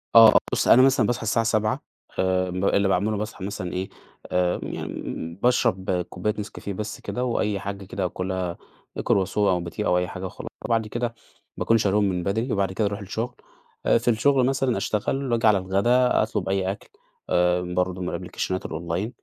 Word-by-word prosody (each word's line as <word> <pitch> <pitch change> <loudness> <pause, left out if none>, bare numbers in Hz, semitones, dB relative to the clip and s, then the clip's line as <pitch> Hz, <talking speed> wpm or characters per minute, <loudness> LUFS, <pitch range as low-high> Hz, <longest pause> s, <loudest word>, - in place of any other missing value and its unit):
آه، 115 -1 +10
بُص، - - +1
أنا 125 - +8
مثلًا 130 -3 +4
باصحى 120 -1 -1
الساعة 115 +1 +1
07:00 110 -1 +1 0.4
آآ 95 0 +1
اللي 100 +2 +1
باعمله، 100 +3 +1
باصحى 105 -2 -5
مثلًا 90 -3 -4
إيه، 95 +1 -3 0.4
آآ 90 -1 +1
يعني - - -5 0.2
امم 85 +1 -5
باشرب 95 -7 +2
كوباية 90 +4 -2
نسكافيه 100 -1 -6
بس 105 +2 -5
كده، 125 - -3
وأي 105 -4 0
حاجة 100 0 -6
كده 95 0 -3
آكلها، 90 -1 -3 0.4
croissant 95 0 +1
أو 95 -4 +3
باتيه 85 +5 -4
أو 90 - +3
أي 90 0 0
حاجة 95 0 -6
وخلاص، 90 - -7 0.2
وبعد 115 -2 +1
كده 120 +2 -2 0.4
باكون 115 - +3
شاريهم 105 -1 +2
من 90 -2 -2
بدري، 110 +7 -1
وبعد 100 -2 0
كده 105 +2 0
أروح 100 +1 -4
الشغل، 110 +4 -4 0.5
آآ - - +5
في 115 - -6
الشغل 125 +3 +4
مثلًا 135 -2 +1
أشتغل، 130 +5 -1
وآجي 115 -1 +3
على 105 -2 +6
الغدا 110 +7 +3
أطلُب 95 -1 -2
أي 95 -1 +1
أكل، 100 - -9 0.4
آآ 90 0 +3
برضه 90 +1 -1
من 90 - -2
الأبليكيشنات 95 0 -3
الonline 85 +6 -3
100 Hz, 180 wpm, -24 LUFS, 90-115 Hz, 0.5 s, آه